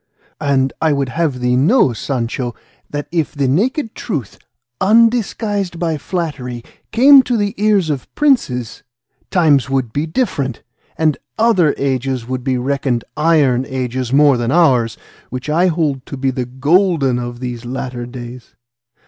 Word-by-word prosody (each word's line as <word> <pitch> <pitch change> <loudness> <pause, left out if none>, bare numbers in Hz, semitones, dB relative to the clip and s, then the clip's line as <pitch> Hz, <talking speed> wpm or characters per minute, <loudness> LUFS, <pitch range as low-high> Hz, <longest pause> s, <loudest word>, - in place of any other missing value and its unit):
And 135 -2 +1
I 160 -2 +3
would 140 -2 -1
have 145 -4 -1
thee 125 0 +2
know, 145 - +3
Sancho, 120 0 -3 0.3
that 145 0 -4
if 165 -4 -1
the 140 -2 0
naked 225 - 0
truth, 145 - -5 0.4
undisguised 215 -4 +2
by 165 -3 -1
flattery, 140 -8 -4 0.3
came 270 +4 +7
to 245 -2 -1
the 205 -1 -1
ears 200 -7 +3
of 135 -4 -5
princes, 135 - +1 0.5
times 145 - +3
would 130 -4 -1
be 150 +3 -1
different, 155 - -2 0.3
and 155 -2 +1 0.2
other 205 -9 +3
ages 130 -3 -2
would 130 -1 -3
be 130 -1 0
reckoned 130 -2 -1
iron 150 -5 +3
ages 130 -1 -3
more 140 -1 +5
than 120 +1 -1
ours, 125 -9 +3 0.3
which 130 +4 -5
I 175 +4 +3
hold 155 -6 -1
to 140 - -6
be 135 0 0
the 125 -1 -3
golden 140 0 +2
of 120 0 -6
these 125 -2 -5
latter 125 -1 -5
days. 120 0 -10
140 Hz, 150 wpm, -17 LUFS, 125-170 Hz, 0.5 s, came